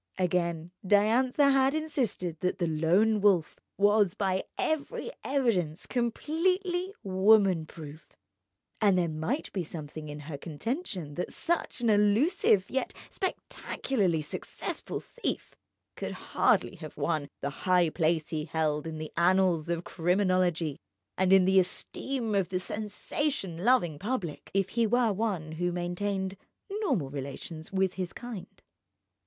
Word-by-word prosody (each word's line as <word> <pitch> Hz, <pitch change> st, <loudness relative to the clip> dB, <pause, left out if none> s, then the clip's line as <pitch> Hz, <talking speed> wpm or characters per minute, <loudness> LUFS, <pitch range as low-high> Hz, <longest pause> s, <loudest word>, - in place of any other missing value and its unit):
Again: 170 Hz, -2 st, 0 dB
Diantha 240 Hz, +8 st, +4 dB
had 270 Hz, +1 st, +3 dB
insisted 250 Hz, -, -1 dB
that 180 Hz, +2 st, 0 dB
the 175 Hz, -, 0 dB
Lone 175 Hz, +7 st, +3 dB
Wolf 190 Hz, -6 st, +3 dB, 0.2 s
was 205 Hz, -2 st, +4 dB
by 190 Hz, -2 st, 0 dB
every 315 Hz, +9 st, -2 dB
evidence 215 Hz, -, 0 dB
completely 355 Hz, -, 0 dB
woman 190 Hz, -3 st, +4 dB
proof; 155 Hz, 0 st, -11 dB, 0.7 s
and 200 Hz, -3 st, +5 dB
there 175 Hz, -1 st, +2 dB
might 160 Hz, -, -2 dB
be 185 Hz, -, -1 dB
something 155 Hz, -1 st, -7 dB
in 150 Hz, 0 st, -7 dB
her 145 Hz, -1 st, -7 dB
contention 180 Hz, -, -4 dB
that 175 Hz, -, -3 dB
such 340 Hz, -6 st, -1 dB
an 230 Hz, -2 st, +3 dB
elusive 210 Hz, -, +3 dB
yet 265 Hz, -, -2 dB, 0.2 s
spectacularly 205 Hz, -, -1 dB
successful 150 Hz, -, -5 dB
thief 485 Hz, -, -4 dB, 0.4 s
could -, -, -4 dB
hardly 190 Hz, -, +1 dB
have 155 Hz, -2 st, -9 dB
won 155 Hz, -4 st, 0 dB
the 140 Hz, -, -1 dB, 0.2 s
high 180 Hz, -3 st, +4 dB
place 160 Hz, -1 st, +1 dB
he 155 Hz, -2 st, -2 dB
held 155 Hz, -1 st, -1 dB
in 160 Hz, -1 st, -5 dB
the 155 Hz, 0 st, -6 dB
annals 175 Hz, -2 st, +3 dB
of 170 Hz, 0 st, -1 dB
criminology 175 Hz, -4 st, +1 dB, 0.4 s
and 190 Hz, 0 st, +2 dB
in 190 Hz, -1 st, +7 dB
the 190 Hz, 0 st, +5 dB
esteem 230 Hz, +5 st, -2 dB
of 195 Hz, -4 st, +1 dB
the 185 Hz, -, -1 dB
sensation 205 Hz, -, -2 dB
loving 175 Hz, -, +3 dB
public, 200 Hz, -, -3 dB
if 195 Hz, -1 st, +2 dB
he 230 Hz, -1 st, +1 dB
were 235 Hz, -1 st, +3 dB
one 190 Hz, -7 st, -2 dB
who 175 Hz, +2 st, -1 dB
maintained 190 Hz, +2 st, -2 dB, 0.3 s
normal 270 Hz, -, 0 dB
relations 145 Hz, +3 st, -6 dB
with 190 Hz, -1 st, +1 dB
his 185 Hz, -2 st, -4 dB
kind. 225 Hz, -7 st, -9 dB
185 Hz, 135 wpm, -29 LUFS, 165-225 Hz, 0.7 s, in